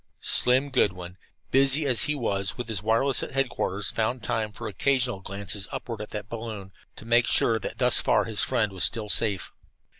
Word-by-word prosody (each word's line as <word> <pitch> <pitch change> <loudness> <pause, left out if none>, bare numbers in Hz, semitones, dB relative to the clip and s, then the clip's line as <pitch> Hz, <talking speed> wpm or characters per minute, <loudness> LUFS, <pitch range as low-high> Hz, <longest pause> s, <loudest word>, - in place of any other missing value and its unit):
Slim 130 +3 +3
Goodwin, 90 -8 0 0.4
busy 135 +3 +4
as 125 -4 +3
he 150 - 0
was 100 -7 -2
with 125 - -4
the 110 -4 -3
wireless 115 +4 +2
at - - -6
headquarters, 120 -7 -1
found 115 +2 -2
time 110 0 -2
for 115 +2 -7
occasional 125 +2 0
glances 100 0 -4
upward 120 -5 -5
at 105 - -7
that 105 -1 -6
balloon, 110 -4 -7 0.2
to - - -12
make 120 +1 +3
sure 115 -1 +3
that - - -6
thus - - +3
far - - +2
his - - -1
friend 105 - 0
was 95 -3 -2
still 105 +5 +1
safe. 100 -4 +1
110 Hz, 185 wpm, -26 LUFS, 100-125 Hz, 0.4 s, busy